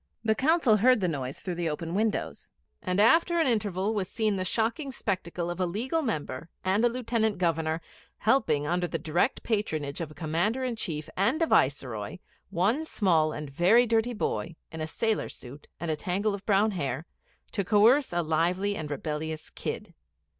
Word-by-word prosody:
The 220 -1 +3
Council 265 -3 +3
heard 250 +3 +5
the 185 - +1
noise 135 -5 -4
through 180 - -3
the 170 -1 -1
open 165 +2 -4
windows; 215 +2 -1 0.3
and, 185 0 -1
after 330 - +5
an 325 - +3
interval, 210 -4 0
was 195 -4 -2
seen 215 -3 0
the 185 - -1
shocking 230 - -1
spectacle 175 -6 -3
of 175 - -6
a 185 - +1
Legal 245 - -1
Member 160 - -3 0.2
and 195 +4 +2
a 240 - +5
Lieutenant 230 -3 0
Governor 165 -2 0 0.4
helping, 190 - +2
under 175 +3 0
the - - -2
direct 175 - 0
patronage 160 -10 -2
of 165 - -4
a 155 - -14
Commander 175 +10 0
in 250 -2 -1
Chief 160 -8 -4
and 230 - +2
a 330 - +3
Viceroy, 130 - +1 0.3
one 200 - +1
small 170 - +2
and 150 -2 -6
very 190 - +5
dirty 230 +1 +1
boy, 170 -6 -2 0.2
in 160 -1 -6
a 155 - -2
sailor's 220 +6 -1
suit 135 +4 -12
and 165 +1 -2
a - - 0
tangle 195 +6 -1
of 200 -1 -7
brown 210 +1 +4
hair, 145 -5 -3 0.5
to 200 - -1
coerce 225 +9 +4
a 175 0 0
lively 175 +6 +1
and 155 -5 -5
rebellious 155 +1 -4
kid. - - -5
185 Hz, 180 wpm, -28 LUFS, 160-225 Hz, 0.5 s, heard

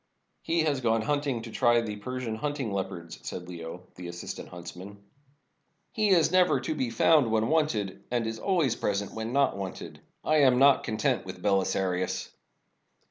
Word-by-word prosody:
"He 165 0 +1
has 145 -4 0
gone 115 -2 +2
hunting 140 -3 -1
to 115 - -8
try 120 -1 +3
the 110 -3 -3
Persian 125 +2 -4
hunting 145 -4 -2
leopards," 90 -4 -5
said 90 -1 -6
Leo, 85 0 -8
the 90 -1 -8
assistant 85 0 -7
huntsman. 90 +3 -9 0.9
"He 215 -4 +1
is 170 -4 +4
never 185 -1 +4
to - - -2
be 130 -5 -1
found 135 +3 +4
when 110 0 +1
wanted, 150 -12 0
and 120 -2 0
is 110 0 -4
always 170 - +1
present 100 -1 -2
when 110 +1 -4
not 140 +1 +2
wanted. 95 -2 -7 0.2
I 155 - +3
am 130 -4 +5
not 140 +1 +5
content 110 0 0
with - - -9
Beli 95 -2 +3
sarius. 95 -1 -1
115 Hz, 170 wpm, -28 LUFS, 100-145 Hz, 0.9 s, am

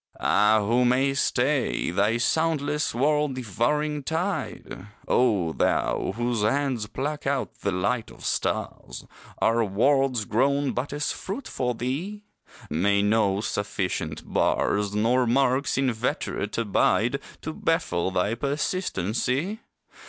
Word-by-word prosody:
Ah, 105 0 +3
who 120 +4 +3
may 130 +3 +3
stay 135 - +1
Thy 100 +5 +2
soundless 150 +1 0
world 150 +1 +1
devouring 145 +6 -1
tide? 160 - -3 0.2
O 100 -10 +2
thou 95 - 0
whose 120 -1 -1
hands 125 0 0
pluck 145 +6 -4
out 135 -1 -2
the 100 - -1
light 100 +6 -1
of - - -12
stars, - - -3 0.3
Are 115 +1 +2
worlds 125 +3 +2
grown 140 +6 +1
but 125 +3 -3
as 145 +1 -1
fruit 220 +8 -6
for 125 -1 -2
thee? 165 - -4 0.4
May 100 +6 +2
no 105 -2 +2
sufficient 95 -6 -3
bars, 105 0 +1
Nor 120 +4 +2
marks 130 +3 +2
inveterate 125 -5 -1
abide 115 +3 +2 0.2
To 160 - -4
baffle 95 - 0
thy 95 +3 0
persistency? 140 - -1
125 Hz, 115 wpm, -25 LUFS, 105-140 Hz, 0.4 s, Ah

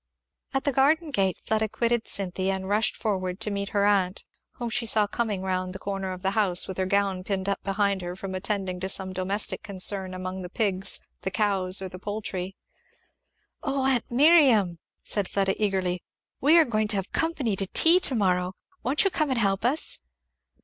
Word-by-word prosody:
At 270 - +1
the 285 - +1
garden 300 +5 +2
gate 195 -8 +1
Fleda 220 0 0
quitted 235 +1 0
Cynthy 190 -1 0
and 190 0 -2
rushed 210 +2 +1
forward 185 -3 -2
to 215 - 0
meet 200 0 -3
her 200 -1 +1
aunt, 195 -2 +1 0.3
whom 240 -1 -5
she 235 0 0
saw 215 -1 +4
coming 205 -2 -2
round 185 -1 -2
the - - -6
corner 195 -1 -4
of 185 0 -8
the 195 - +1
house 195 -4 +2
with 190 0 -6
her 185 - 0
gown 195 -1 0
pinned 195 0 -2
up 200 - -1
behind 195 -1 0
her 175 0 -5
from 190 0 -6
attending 190 -1 -2
to 190 +1 -3
some 190 -1 -2
domestic 190 +3 0
concern 190 -2 -1
among 185 +1 -5
the 180 - -7
pigs, 195 -2 +1 0.2
the - - -2
cows, 190 -2 +1
or - - -3
the 185 0 -10
poultry. 195 -2 -5 1.1
"O 275 -3 -1
aunt 260 -3 +1
Miriam," 245 - +4 0.2
said 205 -3 -1
Fleda 195 -1 +1
eagerly, 185 -3 0 0.4
"we 305 +5 +5
are 330 - +6
going 215 -4 0
to 210 - +2
have 195 -1 -3
company 300 -10 0
to 195 0 -2
tea 330 - +6
to 270 - +3
morrow 180 -3 +1 0.3
won't 265 +5 +1
you 390 - +1
come 310 -4 0
and 260 - 0
help 195 -3 +1
us?" 270 +7 0
200 Hz, 195 wpm, -26 LUFS, 185-225 Hz, 1.1 s, are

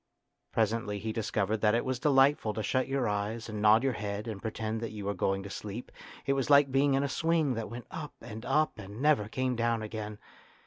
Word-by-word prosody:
Presently 110 -1 0
he 110 +2 -4
dis 110 -1 -2
covered 105 +3 +1
that 105 0 +4
it 120 - 0
was 130 -1 -1
delightful 135 -6 +3
to 110 - -2
shut 130 +3 +1
your 135 -3 0
eyes 105 +3 -2
and 105 -2 -5
nod 110 +3 +6
your 135 -2 +2
head 105 0 -4
and 105 -3 -5
pretend 110 0 -3
that 115 - -3
you 105 -2 -7
were 100 - 0
going 95 +1 0
to 100 - -7
sleep; 105 +5 -6 0.3
it 140 - +2
was 135 -1 -1
like 140 -1 +6
being 135 +1 +3
in 135 - +2
a - - +1
swing 160 0 +1
that 115 -2 -4
went 120 +1 -7
up 155 -3 -6
and 110 -1 -8
up 150 -1 +1
and 100 +2 -8
never 145 -7 +3
came 130 +1 -1
down 115 -1 0
again. 105 -1 -5
115 Hz, 230 wpm, -30 LUFS, 105-135 Hz, 0.3 s, nod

